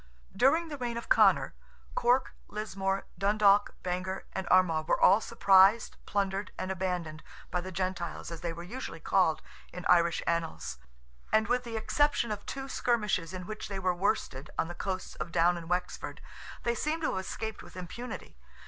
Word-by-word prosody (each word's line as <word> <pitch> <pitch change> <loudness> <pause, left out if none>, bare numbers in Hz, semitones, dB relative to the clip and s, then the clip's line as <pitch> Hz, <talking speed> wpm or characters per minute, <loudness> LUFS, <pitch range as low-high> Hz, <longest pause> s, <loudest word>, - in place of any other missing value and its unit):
During 320 - +3
the 290 -2 -6
reign 240 -2 -2
of 235 - -7
Conor, - - +5 0.4
Cork, 245 +2 +2
Lismore, 195 -2 -2
Dundalk, 205 0 +4
Bangor 185 +1 -3
and 190 - -3
Armagh, 165 -4 +4
were - - +2
all 205 - +6
surprised, 195 +2 +5
plundered, 195 0 -1
and 185 - -3
abandoned 175 -4 -3 0.3
by 180 - 0
"the 185 +1 -7
Gentiles," 185 -1 -3
as 165 - -7
they 175 - -2
are 170 +1 -7
usually 195 -3 -6
called 165 -2 +2 0.3
in 180 0 -7
Irish 170 -1 +4
annals; 165 - -2 0.5
and 220 0 +3
with 245 +2 +1
the 230 -2 -4
exception 280 +1 +1
of 205 -1 -4
two 270 0 -5
skirmishes 210 -10 0
in 185 -1 -6
which 215 +2 -6
they 195 - -5
were 185 -1 +1
worsted 165 -6 -1
on - - +1
the - - -5
coasts 185 +1 -4
of 170 - -5
Down 175 +1 +4
and 170 -1 -7
Wexford, 180 0 -2 0.4
they 235 - +1
seem 305 +7 -1
to 310 - +1
have 190 - -1
escaped 220 +3 -5
with - - -13
impunity. 210 +8 -7
190 Hz, 175 wpm, -30 LUFS, 175-220 Hz, 0.5 s, all